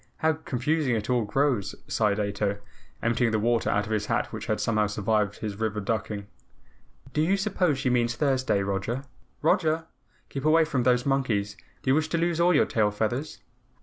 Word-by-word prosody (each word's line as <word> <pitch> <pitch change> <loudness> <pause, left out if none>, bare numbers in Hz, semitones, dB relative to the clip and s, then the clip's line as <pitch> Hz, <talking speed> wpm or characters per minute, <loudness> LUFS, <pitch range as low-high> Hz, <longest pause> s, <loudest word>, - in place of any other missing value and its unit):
How 160 0 +2
confusing 145 -2 -1
it 110 +3 -2
all 120 -3 +2
grows," 115 -4 0
sighed 105 -2 +1
Ato, 100 0 -1 0.5
emptying 115 +1 +2
the 110 - +1
water 115 +1 +1
out 105 0 +1
of 110 - -7
his 105 -1 0
hat 115 0 -1
which 110 -2 -6
had 110 - 0
somehow 105 -2 +1
survived 105 0 0
his 105 -2 -5
river 110 -1 -1
ducking. 105 -1 -3 0.9
"Do 150 - +1
you 185 +5 +2
suppose 190 -7 +1
she 130 -1 0
means 120 -1 +1
Thursday? 130 -6 +1
Roger! 100 +7 -2 0.4
ROGER! 160 0 +2 0.4
Keep 135 +1 -5
away 160 +1 +5
from 140 -5 0
those 125 0 +2
monkeys. 115 -7 0 0.3
Do 130 - +2
you - - +5
wish 155 +2 +1
to 170 - 0
lose 170 0 0
all 175 0 +4
your - - +5
tail 105 -2 +1
feathers?" 110 +8 -3
120 Hz, 185 wpm, -27 LUFS, 105-145 Hz, 0.9 s, away